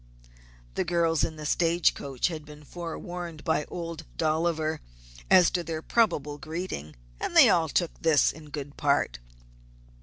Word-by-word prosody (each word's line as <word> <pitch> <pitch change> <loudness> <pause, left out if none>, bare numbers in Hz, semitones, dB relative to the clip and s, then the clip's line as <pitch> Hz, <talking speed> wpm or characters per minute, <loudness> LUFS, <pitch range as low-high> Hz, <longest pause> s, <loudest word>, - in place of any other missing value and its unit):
The - - 0
girls 165 -2 +1
in 160 - -1
the 155 -1 -8
stage 170 +2 +3
coach 135 +3 -2
had 160 -3 -6
been 150 0 -13
forewarned 170 0 -7
by 160 -3 +1
Old 165 -2 -6
Dolliver 160 0 0 0.5
as 180 -2 +6
to 175 - -1
their 160 -1 -4
probable 150 -11 +1
greeting, 155 - -5 0.2
and - - -3
they - - +9 0.2
took 175 -2 +1
this 160 -3 +4
all - - -12
in 150 -1 -13
good 145 -1 -7
part. 140 - +1
160 Hz, 150 wpm, -27 LUFS, 150-170 Hz, 0.5 s, they